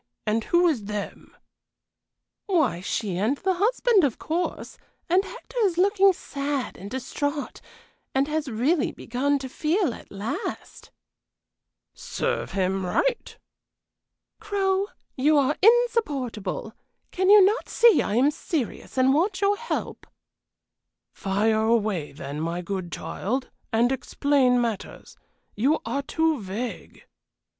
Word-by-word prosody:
and 220 +1 0
who 345 +1 +3
is 255 -11 0
'them'?" 210 0 -6 1.1
"Why, 310 - +2
she 195 -1 -2
and 230 +8 +1
the 380 +4 0
husband, 430 +1 +3
of 270 -6 +1
course, 340 +3 -3 0.3
and 365 +3 +3
Hector - - -8
is 380 -6 +2
looking 395 +1 +5
sad 280 -5 -4
and 195 +2 -9
distrait 285 +4 -4 0.5
and 270 +1 +2
has 305 -1 -2
really 260 +8 +1
begun 275 +4 -1
to 270 -1 -6
feel 310 - 0
at - - -13
last." 215 - -5 1.0
"Serve - - -3
him 190 0 0
right!" 475 - -1 1.0
"Crow, 395 -2 0 0.3
you 295 +3 +3
are 285 +1 +2
insupportable! 295 - +1 0.4
Can 375 +1 +1
you 410 -2 +9
not 425 +5 0
see 470 -2 +5
I 205 - -2
am 270 +5 +4
serious 295 -5 -4
and 260 +1 +4
want 375 +6 +1
your 400 +1 +3
help?" 470 +3 -5 1.1
"Fire 215 +3 +1
away, 215 -8 +1
then, 140 0 -7
my 170 +2 -3
good 185 -1 -4
child, 255 +6 -3 0.2
and 235 +3 +3
explain 265 -1 +2
matters. 230 -4 -4 0.4
You 275 +9 +2
are 280 - -1
too 320 -1 0
vague!" 205 +6 -6
275 Hz, 125 wpm, -25 LUFS, 220-365 Hz, 1.1 s, you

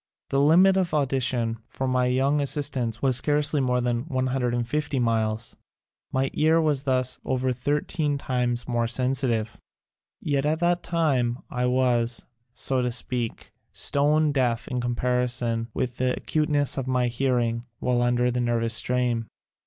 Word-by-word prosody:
The 135 - +2
limit 180 +6 +5
of 180 -4 0
audition 125 -5 0
for 130 - -3
my 125 -1 +1
young 135 +3 +1
assistants 135 -5 -2
was 130 -3 +3
scarcely 145 +1 +1
more 125 -1 +1
than 120 +1 -1
150 130 0 -1
miles. 115 -1 -1 0.6
My 130 0 0
ear 160 +2 +3
was 150 -4 +1
thus 130 -1 0
over 130 0 0
thirteen 145 +3 -1
times 125 -3 -1
more 120 -1 0
sensitive. 125 -3 0 0.6
Yet 140 -2 -1
at 155 +2 +1
that 175 +1 +1
time 140 -8 0
I 125 0 0
was, 125 -2 +1 0.3
so 130 +1 -1
to 125 0 -1
speak, 120 -1 -3 0.2
stone 150 +2 +3
deaf 120 -4 0
in 125 -1 -2
comparison 120 -1 -1
with 125 +2 -3
the 130 0 +1
acuteness 150 -3 0
of 130 - -4
my 125 -1 +1
hearing 120 -2 0
while 125 +1 0
under 120 0 +2
the 125 0 -1
nervous 115 -1 0
strain. 120 -1 0
125 Hz, 145 wpm, -25 LUFS, 120-140 Hz, 0.6 s, limit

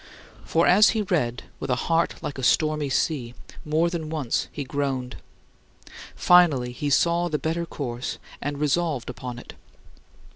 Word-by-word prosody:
For 165 +1 +2
as 205 +4 +6
he 215 - +1
read 130 - -1 0.2
with - - -5
a 125 - +3
heart 165 +6 0
like 140 - -5
a - - -5
stormy 155 +1 +2
sea, 130 -4 -1 0.3
more 155 +3 +1
than 170 -3 -4
once 150 -7 -1
he 145 - -5
groaned. 135 -2 -3 1.0
Finally 155 -9 +4
he 145 +4 -3
saw 170 +4 +2
the 155 - 0
better 165 +2 -2
course, 125 -5 -4 0.2
and 145 0 -3
resolved 150 -3 0
on 125 -1 -5
it. - - -10
150 Hz, 150 wpm, -25 LUFS, 130-170 Hz, 1.0 s, as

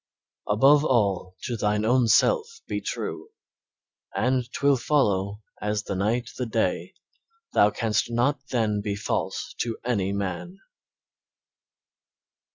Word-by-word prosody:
"Above 135 +8 +5
all, 100 - +1
to 120 - -2
thine 105 0 0
own 125 +1 +3
self 450 - +4 0.2
be - - -3
true, 430 - -5 0.9
And 125 -1 0
'twill 140 0 +3
follow 105 -6 0 0.2
as 105 0 -1
the - - -4
night 110 +5 -1
the 125 - -1
day, 110 - -1 0.6
Thou 105 - +5
canst 110 +1 0
not 125 +4 +1
then 110 -4 0
be 100 -1 -2
false 100 - -3
to 115 -2 -2
any 100 -6 0
man." 100 - -4
115 Hz, 120 wpm, -25 LUFS, 105-125 Hz, 0.9 s, Above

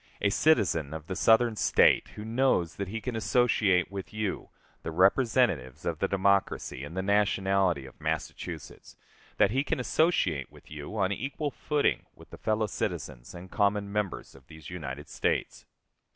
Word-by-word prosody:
A 100 - +1
citizen 80 - +2
of 80 0 -8
a - - -1
Southern 115 +3 +4
State - - +4
who 105 - -7
knows 115 -8 +1
that 100 - -3
he 110 +4 -4
can 120 +2 -4
associate 110 -5 +2
with 100 -1 -6
you, 105 -2 -3 0.3
the - - -5
representatives 95 - +2
of - - -2
the - - +1
Democracy 100 -8 0
and 75 +6 -8
the 95 - 0
nationality 95 -5 +2
of 65 - -15
Massachusetts, - - -5 0.4
that 100 - +4
he 135 +4 +1
can 145 - -2
associate 120 - +1
with - - -18
you 75 +8 -7
on 95 -1 +1
equal 140 +7 -3
footing 150 +1 0
with - - -17
the - - -11
fellow 110 0 0
citizens 65 - -5
and 90 +1 -10
common 100 -1 +1
members 105 -2 -3
of 70 -1 -18
these 80 0 -11
United 75 -5 -6
States. - - -2
100 Hz, 165 wpm, -28 LUFS, 85-110 Hz, 0.4 s, Southern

